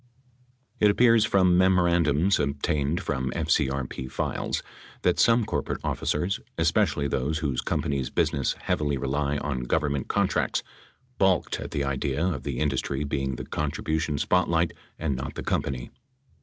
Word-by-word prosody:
It 105 - +5
appears 115 0 +5
from 90 -4 +4
memorandums 85 -2 +3
obtained 75 +2 0
from 65 -3 -1
FCRP 65 -1 -1
files - - -2 0.4
that - - +2
some 115 -1 +4
corporate 75 -10 -2
officers 90 +6 -1
— - - -42
especially 70 - +2
those 70 +3 -1
whose 70 -5 -1
companies' 70 -5 -1
business 70 - 0
heavily 75 -2 0
rely 70 +2 -1
on 70 -3 -2
Government 70 -1 0
contracts - - 0 0.3
— 125 -1 -38
balked 95 -2 +2
at - - -6
the 70 - -2
idea 70 +3 -1
of 85 -8 -1
the - - -4
industry 70 -1 -1
being 70 -2 -2
the - - -6
contribution 75 0 -2
spotlight 85 0 +2 0.2
and 75 -4 -1
not 65 +1 -5
the - - -5
company. 65 -3 -2
75 Hz, 140 wpm, -26 LUFS, 70-85 Hz, 0.4 s, It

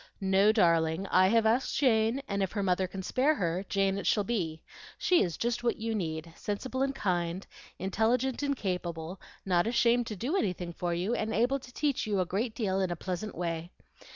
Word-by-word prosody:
"No, 195 +2 +4
darling, 170 -3 +2
I 185 0 +6
have 225 +2 +3
asked 235 +4 +2
Jane, 235 0 +2
and 200 0 -1
if 190 - -1
her 205 -2 -1
mother 185 0 +1
can 190 +1 -7
spare 275 +10 +2
her, 180 - -1
Jane 195 0 +1
it - - -4
shall 205 - +3
be. 175 -8 -2 0.3
She 360 -2 +3
is 170 -4 -1
just 240 0 -1
what 235 - +1
you 225 0 -2
need, 165 -4 -3
sensible 260 +6 -3
and 275 0 0
kind, 175 -3 -1 0.3
intelligent 235 +7 0
and 280 -1 0
capable; 180 -3 -4 0.2
not 180 0 +2
ashamed 235 0 +3
to 215 - -4
do 255 - -2
anything 180 - -1
for 175 +1 -2
you, 185 +7 -1
and 220 -2 -1
able 250 +5 +2
to 250 -1 -13
teach 280 -3 -1
you 205 -2 0
a 185 - +2
great 215 +6 -2
deal 195 -5 0
in 190 - 0
a 175 - -2
pleasant 185 +4 -4
way. 170 -1 -3
200 Hz, 205 wpm, -30 LUFS, 180-235 Hz, 0.3 s, I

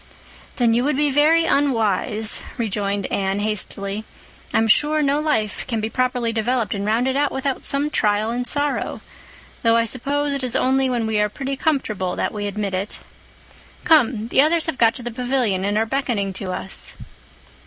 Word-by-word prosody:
"Then 235 -2 +3
you 240 +2 +2
would 290 0 0
be 295 -1 +2
very 310 +4 +4
unwise," 220 - +1 0.2
rejoined 205 -3 -1
Anne 195 0 0
hastily. 205 -1 -2 0.5
"I'm 225 - +2
sure 300 +7 +3
no 285 +1 +2
life 220 -10 -1
can 230 -3 -1
be 220 +1 -3
properly 250 -2 0
developed 230 -1 0
and 200 - -3
rounded 245 +5 +1
out 285 +1 +1
without 265 0 -2
some 285 +2 -1
trial 210 -1 +1
and 245 +1 -2
sorrow—though 285 -4 -3
I 230 - +3
suppose 280 +5 0
it 275 -1 -3
is 250 -2 0
only 265 0 +2
when 240 -3 0
we 220 -1 +1
are 210 - +1
pretty 275 +5 -4
comfortable 225 - -1
that - - -2
we 205 -1 -3
admit 200 -1 -3
it. 190 +3 -3 0.9
Come—the 250 -6 +3
others 320 +2 +2
have 320 -5 -3
got 230 -1 +4
to 250 - -8
the 240 - -4
pavilion 245 -5 0
and 205 +1 0
are 220 - +2
beckoning 225 -6 -1
to 185 0 -4
us." 190 +1 -3
235 Hz, 175 wpm, -21 LUFS, 210-275 Hz, 0.9 s, very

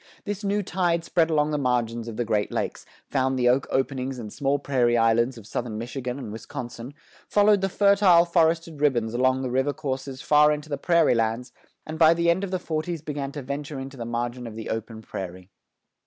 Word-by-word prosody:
This 205 0 -4
new 205 +1 0
tide 175 -3 0
spread 165 -1 +1
along 150 -1 +2
the 150 - 0
margins 120 -3 -1
of 115 - -6
the 120 - -1
Great 105 -2 0
Lakes, - - -3 0.2
found 130 -1 0
the 125 -1 +2
oak 130 +2 +3
openings 130 0 -1
and 110 -4 -7
small 140 0 +1
prairie 125 -4 +1
islands 115 +2 +2
of 110 - -12
Southern 115 -1 -4
Michigan 125 +2 -4
and 130 -6 -7
Wisconsin; 120 +3 -7 0.3
followed 205 -1 +4
the 195 - 0
fertile 200 -3 +5
forested 165 -2 +1
ribbons 120 -6 +1
along 130 +2 +2
the 125 - -3
river 135 +3 +1
courses 135 -3 -4
far 150 +1 +5
into 150 +1 -4
the 145 - -2
prairie 170 -1 +3
lands; 115 +2 -1 0.3
and 160 +1 -6
by 165 0 +6
the 170 0 +3
end 185 +3 -1
of 200 - -3
the 185 - -1
forties 160 -1 -3
began 145 -3 -4
to 145 - -6
venture 140 +2 -5
into 135 +1 -7
the 120 - -6
margin 120 +1 -3
of 110 - -9
the 110 -1 -5
open 110 0 -5
prairie. 90 -1 -7
135 Hz, 205 wpm, -25 LUFS, 120-160 Hz, 0.3 s, by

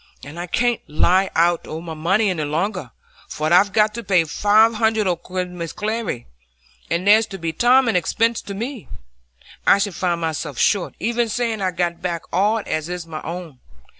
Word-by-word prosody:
And 150 +4 -9
I 175 - -4
can't 240 +5 0
lie 185 +5 +2
out 170 +1 +2
o' 155 - -5
my 165 -1 -7
money 190 +7 +1
any 160 -4 -2
longer, 165 +9 -2 0.4
for 155 +2 -1
I've 195 +3 +5
got 210 +1 +3
to 235 +1 -6
pay 180 -4 +3
five 210 +7 +3
hundred 220 -1 +1
o' 180 -2 +1
Mrs 180 -1 -5
Glegg's, 215 - -3 0.6
and 170 +2 -1
there'll 210 -1 +4
be 165 -1 -3
Tom 250 +7 +4
an 225 - +1
expense 230 +6 +1
to 200 - -7
me. 235 +2 -5 0.8
I - - +7
should 200 -1 -1
find 175 0 -1
myself 155 -4 -3
short, 200 -4 +1
even 235 0 0
saying 225 -2 -1
I'd 185 -2 -2
got 175 -1 -1
back 170 -2 -3
all 205 +4 +2
as 155 +1 -3
is 180 -1 -5
my 160 -2 -7
own. 165 -5 -7
185 Hz, 185 wpm, -21 LUFS, 170-220 Hz, 0.8 s, I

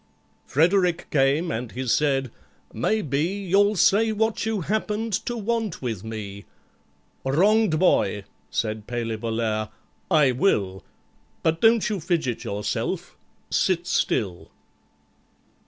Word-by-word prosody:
FREDERICK 175 +3 +2
came, 145 +4 +2
and 115 +1 -4
he 130 +2 -4
said, 135 0 +1 0.4
"Maybe 140 - 0
You'll 200 +3 +2
say 215 +4 +4
what 220 0 0
you 220 -3 -1
happened 215 +3 -2
to 240 - -2
want 225 -3 -2
with 115 -6 -3
me?" 105 -3 -7 0.8
"Wronged 185 +6 +3
boy," 105 - +2 0.3
said 110 +6 -2
PALEY 115 -2 -3
VOLLAIRE, 110 -1 -2 0.4
"I 150 -7 +4
will, 100 - 0 0.6
But 165 0 +1
don't 225 -1 +5
you 210 -2 -2
fidget 155 -8 -1
yourself—sit 105 +1 -2
still." 90 -4 -1
150 Hz, 105 wpm, -24 LUFS, -, 0.8 s, don't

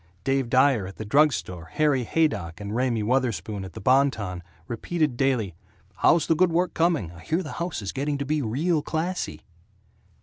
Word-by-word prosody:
Dave 135 -2 0
Dyer 130 -6 +3
at 95 - -10
the 110 - -6
drug 150 +8 +5
store, 90 -9 -5
Harry 145 -4 +2
Haydock 105 - 0
and 105 +1 -5
Raymie 120 -3 +1
Wutherspoon 110 -5 -1
at 95 -3 -9
the - - -8
Bon 135 +6 +4
Ton, 90 -8 -5 0.3
repeated 150 +4 -1
daily, 120 -8 0 0.4
"How's 165 -2 +4
the - - +3
good 180 +1 +3
work 175 +2 +1
coming? 160 - +1
I 85 - -13
hear 165 - -1
the 150 - -7
house 170 - -3
is 95 - -3
getting 140 +2 -2
to 140 - -3
be 150 +2 0
real 150 +8 0
classy." 170 +5 -3
135 Hz, 190 wpm, -25 LUFS, 105-155 Hz, 0.4 s, drug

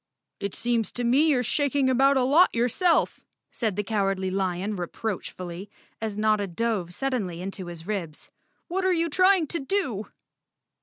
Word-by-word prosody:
"It 200 -1 -4
seems 235 -2 0
to 245 - -2
me 265 +7 +4
you're 265 -5 +3
shaking 280 +2 +1
about 270 +2 +4
a 260 - +3
lot 300 +8 +5
your¬ 240 +1 +1
self," 355 -3 +2 0.3
said 220 -5 -2
the 210 - -1
Cowardly 195 -3 0
Lion 190 +2 -1
reproachfully, 185 -1 -5 0.3
as 215 -2 -3
Notta 215 -1 +2
dove 195 -1 -2
suddenly 205 -7 -2
into 190 0 -5
his 170 -1 -8
ribs. 180 -7 -5 0.4
"What 375 +2 -2
are 375 - +3
you 335 -1 +1
trying 370 0 +4
to 335 +3 -3
do?" 270 - -2
225 Hz, 160 wpm, -26 LUFS, 195-275 Hz, 0.4 s, lot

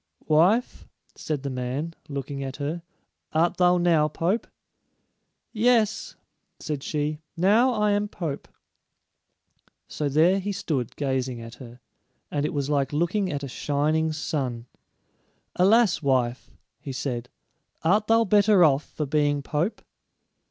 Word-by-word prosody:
"Wife," 180 +10 +2 0.3
said 150 -3 -4
the 140 - -3
man, 130 +6 -3 0.2
looking 140 0 -4
at 135 0 -5
her, 155 +4 -4 0.5
"art 170 +3 +2
thou 180 0 +4
now 170 -3 +3
pope?" 175 +8 -1 1.1
"Yes," 225 -1 +2 0.4
said 150 -3 -4
she; 150 +1 -2 0.2
"now 215 +9 +4
I 210 -2 +2
am 205 0 +1
pope." 160 -8 -5 1.4
So 150 -2 -2
there 165 +7 +4
he 200 +1 -3
stood 145 - -3
gazing 130 -3 -2
at 115 0 -9
her, 120 0 -12 0.5
and 145 0 0
it - - -4
was 140 -1 -1
like 140 -2 0
looking 175 +6 0
at 145 -1 -4
a - - -3
shining 150 +4 0
sun. 130 -6 -3 0.9
"Alas, 205 +2 +4
wife," 130 -3 0 0.3
he 140 - -7
said, 125 -2 -4 0.5
"art 205 +6 +2
thou 225 0 +4
better 205 -1 +5
off 145 -2 +4
for 150 - -4
being 145 0 +1
pope?" 160 +9 -2
155 Hz, 130 wpm, -25 LUFS, 140-185 Hz, 1.4 s, better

